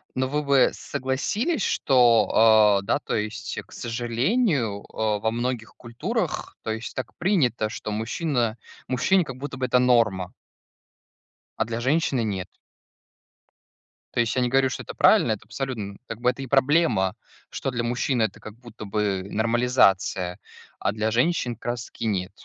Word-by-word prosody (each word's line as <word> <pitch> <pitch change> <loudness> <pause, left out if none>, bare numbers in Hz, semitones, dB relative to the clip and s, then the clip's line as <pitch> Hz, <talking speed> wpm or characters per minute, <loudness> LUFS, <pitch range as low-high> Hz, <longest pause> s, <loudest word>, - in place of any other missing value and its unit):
но 130 0 0
вы 150 +3 -1
бы 140 -2 +4
согласились, 205 - -2
что, 120 -4 +4
а, 110 -3 +6
да, 105 - +1
то - - -3
есть, 110 +1 -3
к - - -24
сожалению, 120 - -1
а, 110 -1 0
во 110 +2 0
многих 120 -1 -3
культурах, 120 -1 -3
то 110 - -3
есть, 110 +1 -5
так 130 -3 -5
принято, 135 - +1
что 110 -1 -6
мужчина 115 +1 -1 0.3
мужчине 180 +9 +2
как 130 -3 -8
будто 140 0 -6
бы 130 - -1
это 125 0 +3
норма 110 -7 +2 1.3
а - - +2
для 115 +1 -4
женщины- 135 0 +1
нет. 95 -4 -3 1.7
То - - -1
есть, 115 - -1
я 130 - +2
не 125 - +1
говорю, 135 +1 +3
что 125 - -5
это - - -9
правильно, - - +5
это - - -7
абсолютно, 130 -5 -4
м, 100 - -15
как 115 - -6
бы 125 - +3
это 125 +2 -3
и 135 - -5
проблема, 135 - +2 0.3
что 135 - -3
для 120 -1 -2
мужчин 120 +1 0
это 110 - -1
как 110 - -10
будто 115 -2 -11
бы 100 -2 -1
нормализация, 105 -6 +2 0.4
а - - 0
для 110 +1 -1
женщин 125 0 +1
как 115 - -20
раз-таки 120 -1 -4
нет. 95 -3 -1
120 Hz, 165 wpm, -24 LUFS, 110-130 Hz, 1.7 s, а